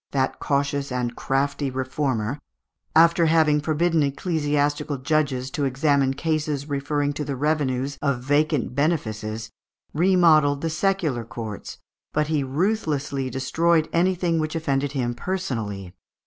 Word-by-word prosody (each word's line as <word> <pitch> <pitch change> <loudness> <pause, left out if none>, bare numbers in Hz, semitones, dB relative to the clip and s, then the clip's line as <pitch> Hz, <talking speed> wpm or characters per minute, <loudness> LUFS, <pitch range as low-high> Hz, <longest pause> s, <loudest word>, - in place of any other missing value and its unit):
that 135 -1 -1
cautious 140 -1 -1
and 125 -1 -2
crafty 140 +1 -1
reformer, 130 -1 -2 0.6
after 170 +1 +5
having 155 -2 +3
forbidden 160 +2 +1
ecclesiastical 145 -1 0
judges 135 -2 0
to 145 - -2
examine 140 0 +2
cases 150 -2 -1
referring 145 0 -1
to 150 - -3
the 140 -1 -3
revenues 140 -1 -1
of 135 -4 0
vacant 145 -1 +1
benefices, 110 -7 -2 0.4
remodelled 155 -5 +4
the 165 - -1
secular 160 -8 0
courts, 110 -2 -7 0.4
but 150 0 0
he 150 -3 +1
ruthlessly 145 -4 -1
destroyed 160 +5 +1
anything 175 -1 +2
which 155 +1 -2
offended 145 -3 -1
him 120 -3 -1
personally. 115 - -4
145 Hz, 120 wpm, -24 LUFS, 130-155 Hz, 0.6 s, after